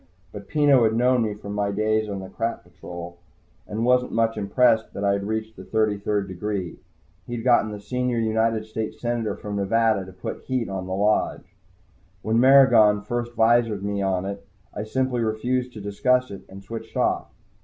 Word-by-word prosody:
But 100 -1 -9
Peno 145 -3 +4
had 110 0 +2
known 125 +1 +3
me 110 -2 -1
from 100 0 -8
my 105 0 0
days 110 +1 0
on 100 -1 -4
the 95 - -8
Crap 115 0 -3
Patrol, 85 -1 -10 0.5
and 110 +2 -2
wasn't 125 0 +3
much 115 0 +1
impressed 110 +2 +2
that 100 - -4
I'd 100 0 +1
reached 110 +1 -3
the 95 - -10
thirty 110 0 0
third 100 -1 -1
degree. 95 -1 -4 0.5
He'd 120 -1 -4
gotten 120 -3 +4
the 105 - -6
Senior 125 +4 -2
United 110 0 +1
States 110 0 -5
senator 120 -2 -2
from 105 -1 -5
Nevada 110 0 +2
to 95 - -11
put 95 0 -7
heat 130 -4 -1
on 95 -1 -4
the 95 - -2
Lodge. 105 +2 0 0.7
When 110 +1 +1
Maragon 120 -6 +6
first 120 +2 -3
visored 115 -3 +3
me 100 0 -2
on 95 -1 0
it, 100 0 -5 0.3
I 105 - -4
simply 130 +1 -1
refused 125 +3 -1
to 110 - -8
discuss 125 +5 +1
it 100 - -8
and 95 +1 -11
switched 115 +3 -8
off. - - +1
110 Hz, 185 wpm, -24 LUFS, 100-120 Hz, 0.7 s, Maragon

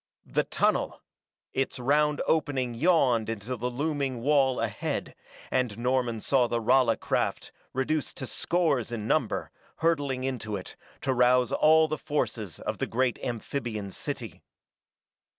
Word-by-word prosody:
The - - 0
tunnel! - - 0 0.5
Its 135 0 -1
round 145 +4 +2
opening 135 -6 +1
yawned 125 -6 +3
in 115 - -2
the 115 +6 -5
looming 130 +1 -2
wall 135 -1 +3
ahead, - - -2 0.4
and 125 -5 0
Norman 120 -2 0
saw 130 0 +3
the 120 0 0
Rala 120 0 +3
craft, - - -1 0.2
reduced 135 +3 -1
to 130 - -4
scores 145 -5 0
in 110 -3 -4
number, - - 0 0.2
hurtling 145 -6 0
into 120 -5 -3
it, 95 - -7 0.3
to 135 - +1
rouse 125 0 +4
all 160 +1 +5
the 155 0 -3
forces 110 - -2
of - - -4
the - - -1
great 125 +1 0
amphibian 115 -4 -3
city. - - -5
130 Hz, 135 wpm, -28 LUFS, 120-145 Hz, 0.5 s, all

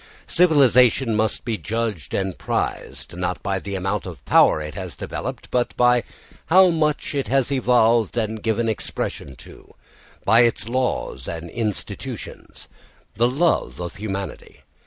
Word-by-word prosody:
Civilisation 130 -8 +4
must 110 -1 -1
be 115 -3 -2
judged 110 -7 -3
and 95 -2 -1
prized, 85 - -3
not 90 0 -3
by 95 -1 -1
the 100 +1 -5
amount 95 +2 -2
of 80 -8 -10
power - - +5
it 75 -1 -6
has - - -7
developed, - - -6
but 125 -1 0
by 125 0 +4 0.5
how 185 +3 +6
much 155 -3 0
it 140 -2 -1
has 135 0 +1
evolved 120 -4 +3
and 110 -1 -2
given 115 +1 0
expression 85 - -4
to, - - -16 0.5
by 115 - +5
its 115 -2 +2
laws 125 +1 -2
and 85 0 -6
institutions, 110 -4 -5 0.5
the 120 +3 +2
love 155 +7 0
of 85 -1 -6
humanity. 100 -2 -6
115 Hz, 140 wpm, -22 LUFS, 95-125 Hz, 0.5 s, how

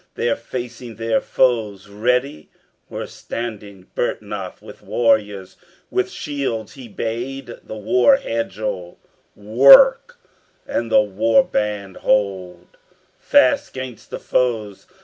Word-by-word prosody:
There 120 -1 0
facing 120 -1 -7
their 115 +1 0
foes 110 -6 0
ready 120 - -1 0.4
were - - -5
standing 105 -5 -7
Byrhtnoth 105 -5 -4
with - - -13
warriors: 105 -5 0 0.3
with 380 0 0
shields 140 - -4
he 130 -3 -11
bade 120 +4 -5
The 110 - -8
war 125 - +4
hedgel 105 - -4 0.4
work, 140 - +6 0.5
and 115 -1 -3
the - - +6
war 105 - +2
band 105 - -3
hold 100 - -1 0.4
Fast 285 0 +3
'gainst 130 -3 -8
the - - -5
foes. 110 -6 -2
115 Hz, 110 wpm, -20 LUFS, 105-125 Hz, 0.5 s, work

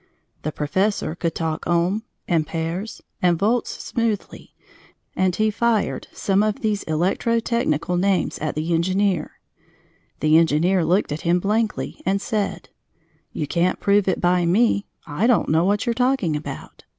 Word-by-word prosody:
The 155 - -3
professor 185 +5 -1
could 165 -1 -3
talk 160 -1 -3
ohm, 175 +5 +1 0.3
ampères, 165 +4 -2 0.2
and 175 -2 +3
volts 225 +7 0
smoothly, 225 -4 -3 0.6
and 185 -1 +1
he 215 0 +1
"fired" 225 -1 0
some 195 0 +1
of 215 -1 -1
these 210 -3 0
electrotechnical 180 0 0
names 195 0 +1
at 155 - -3
the 160 +3 -1
engineer. 185 0 0 0.8
The 155 +1 +5
engineer 170 +3 +2
looked 180 0 +1
at 150 - -3
him 175 +1 +2
blankly 215 +3 -1
and 195 +1 +1
said: 210 -1 -3 0.6
"You 150 - -3
can't 170 +4 0
prove 200 -1 +2
it 185 - +1
by 180 0 +2
me. 200 +4 +2 0.2
I 165 +9 0
don't 245 -4 +3
know 160 +3 +3
what 205 +4 +1
you're 235 - +1
talking 245 - +1
about. 150 - -7
185 Hz, 145 wpm, -22 LUFS, 165-210 Hz, 0.8 s, The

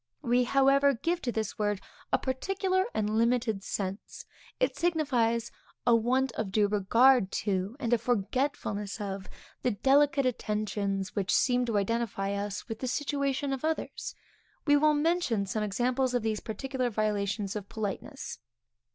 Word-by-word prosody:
We, 245 +1 +3
however, 275 +1 +4
give 340 +8 -1
to 245 - -1
this 220 -2 -3
word 205 -2 0 0.3
a - - +4
particular 375 +8 0
and 215 0 0
limited 230 -4 +1
sense. 195 0 -5 0.3
It - - +1
signifies 250 -9 +1 0.3
a 240 -1 +6
want 255 +3 +2
of 220 -3 -3
due 205 +1 +3
regard 210 +2 +4
to, 195 +2 -1
and 240 -3 0
a 240 - +4
forgetfulness 225 -2 -1
of, 195 -2 -5 0.3
the 250 - +2
delicate 275 +5 +3
attentions 210 -4 -2
which 195 -3 0
seem 250 -1 +3
to 225 -3 +1
identify 200 -1 -1
us 200 0 -4
with 225 -2 -5
the 255 - -3
situation 280 0 -1
of 270 - -4
others. 315 0 -3 0.5
We 290 -2 +5
will 300 +1 +4
mention 295 - +1
some 205 +3 -2
examples 245 +5 0
of 245 - +1
these 220 -1 0
particular 255 +3 -3
violations 205 -2 -1
of 205 -2 -5
politeness. 220 - -5
235 Hz, 150 wpm, -29 LUFS, 205-270 Hz, 0.5 s, a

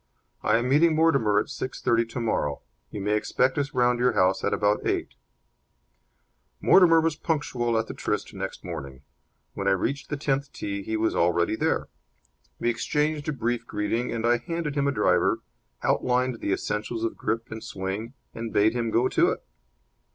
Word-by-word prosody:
"I - - +3
am 120 +2 -1
meeting 155 +4 +4
Mortimer 140 -10 +3
at 105 - +2
six 130 - -5
thirty 115 0 +2
tomorrow. 115 - -2 0.3
You 105 - -6
may 105 +2 0
expect 130 +6 +1
us 140 -1 -3
round 125 -1 +3
at - - -2
your 125 - +3
house 95 +1 +2
at - - +1
about 105 0 +1
eight." - - -1 1.5
Mortimer 170 -3 +6
was 160 -1 +1
punctual 130 -7 -1
at 110 - 0
the - - -7
tryst 105 0 -3
next 95 -1 -6
morning. 70 -6 -7 0.5
When 100 - -3
I 100 - +5
reached 140 +9 -2
the 145 - -2
tenth 140 0 -1
tee 100 -1 -4
he 110 +3 -2
was 110 0 0
already 85 +4 +2
there. - - 0 0.7
We - - -2
exchanged 150 +5 -1
a - - +1
brief 120 -4 -2
greeting 110 +4 -1
and 115 0 -2
I 120 +1 +4
handed 165 +4 -3
him 140 -1 +1
a - - +2
driver, - - +2 0.4
outlined 125 -1 +1
the - - -2
essentials 105 +3 -2
of 115 - -1
grip 115 +2 -3
and 110 0 -6
swing, 100 +6 -5 0.2
and 115 0 -5
bade 105 +2 +3
him 120 -2 -1
go 120 +3 +2
to - - +3
it. - - -4
115 Hz, 180 wpm, -26 LUFS, 105-135 Hz, 1.5 s, Mortimer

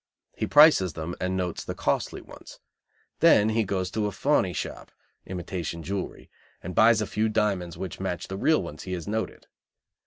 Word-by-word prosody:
He - - -2
prices 145 - +6
them 80 +2 -5
and 95 0 -1
notes 90 -2 -3
the - - -5
costly - - -1
ones. - - -13 0.6
Then 105 +1 +5
he 110 +1 +1
goes 95 -2 -2
to 105 0 -1
a - - -3
fauny 135 -10 +1
shop - - -6 0.4
(imitation 85 -2 -5
jewelry) 100 +1 -5 0.3
and 90 - -5
buys 110 +1 +5
a - - 0
few 110 +2 0
diamonds 100 -6 -1
which 95 -3 -6
match 90 -3 -3
the 95 - -5
real 155 +5 +2
ones 75 -3 -8
he 95 - -5
has 85 -1 -5
noted. 110 +1 -3
95 Hz, 180 wpm, -26 LUFS, 90-110 Hz, 0.6 s, prices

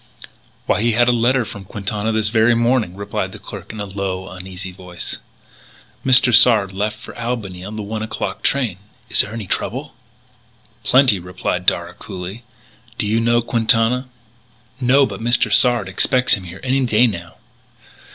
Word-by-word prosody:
"Why, - - +1
he 115 0 +2
had 120 +2 +3
a - - +5
letter 120 +1 +2
from 100 -2 -8
Quintana 105 +2 -3
this 110 -1 +1
very 110 +1 +3
morning," 115 -5 +1
replied 100 +1 -4
the - - -8
clerk - - -9
in 110 - -9
a 105 - -3
low, 95 -1 -4
uneasy 95 0 -8
voice. 90 -1 -7 0.8
"Mr. 130 -1 +5
Sard 105 -5 +5
left 105 +2 -2
for - - -12
Albany 115 -7 -4
on 105 +3 -7
the 105 - -4
one 110 +2 -4
o'clock 105 -2 -4
train. 125 -10 0 0.3
Is - - +5
there 105 - -6
any 110 -2 -5
trouble?" 130 +9 -3 0.9
"Plenty," 130 -6 +4
replied 90 0 -4
Darragh - - +1
coolly; 95 +5 -7 0.6
"do - - -1
you 110 +2 +1
know 120 0 +2
Quintana?" 115 +2 +2 0.7
"No. 135 +2 +4
But 100 -3 -7
Mr. 120 -2 +2
Sard 120 -2 +4
expects 125 +6 +3
him 95 - 0
here 90 +2 -9
any 135 +1 +1
day 120 0 +4
now." 85 -7 -4
110 Hz, 165 wpm, -19 LUFS, 95-120 Hz, 0.9 s, a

